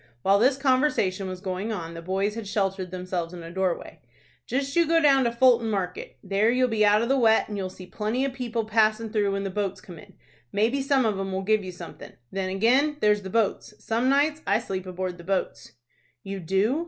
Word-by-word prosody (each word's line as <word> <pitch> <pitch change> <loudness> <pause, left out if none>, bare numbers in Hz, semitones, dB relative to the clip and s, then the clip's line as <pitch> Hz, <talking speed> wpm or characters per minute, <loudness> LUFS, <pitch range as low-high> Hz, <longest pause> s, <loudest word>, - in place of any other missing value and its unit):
(While 195 +1 +4
this 260 +4 +3
conversation 255 -9 +1
was 185 -1 -7
going 190 +3 -3
on, 170 -6 -5
the 165 - -8
boys 195 +4 -1
had 225 -2 -6
sheltered 195 -2 -1
themselves 180 -1 -4
in 170 - -9
a 165 - -9
doorway.) 185 -1 -3 0.5
"Just 275 +2 -2
you 340 -2 +4
go 330 +1 +4
down 275 -4 +4
to 235 - +1
Fulton 235 -1 +4
Market. 185 -4 -4
There 200 +3 +2
you'll 250 +1 +2
be 220 -2 +2
out 210 +1 +4
of - - -1
the 270 +1 +2
wet, 225 -2 +4
and 210 - -6
you'll 190 -2 -3
see 185 0 -11
plenty 215 +7 -2
of 275 - -3
people 235 -3 -3
passin' 220 0 +1
through 205 -2 +1
when 195 0 -2
the 195 - -3
boats 200 -1 -2
come 175 -4 -12
in. - - -15 0.4
Maybe 230 +7 +1
some 270 -2 +2
of 210 -3 0
'em 195 0 -3
will 190 0 -2
give 215 +1 +2
you 185 - -6
somethin'. 175 -1 -11 0.2
Then 190 -1 -2
ag'in, 255 +10 +2
there's 210 -4 +3
the 190 - -7
boats. 215 0 -1
Some 230 +4 0
nights 295 +3 +2
I - - +4
sleep 190 -1 -5
aboard 185 -1 -4
the - - -10
boats." 190 +1 -3 0.5
"You 195 0 -5
do? 195 - +1
210 Hz, 225 wpm, -25 LUFS, 190-245 Hz, 0.5 s, While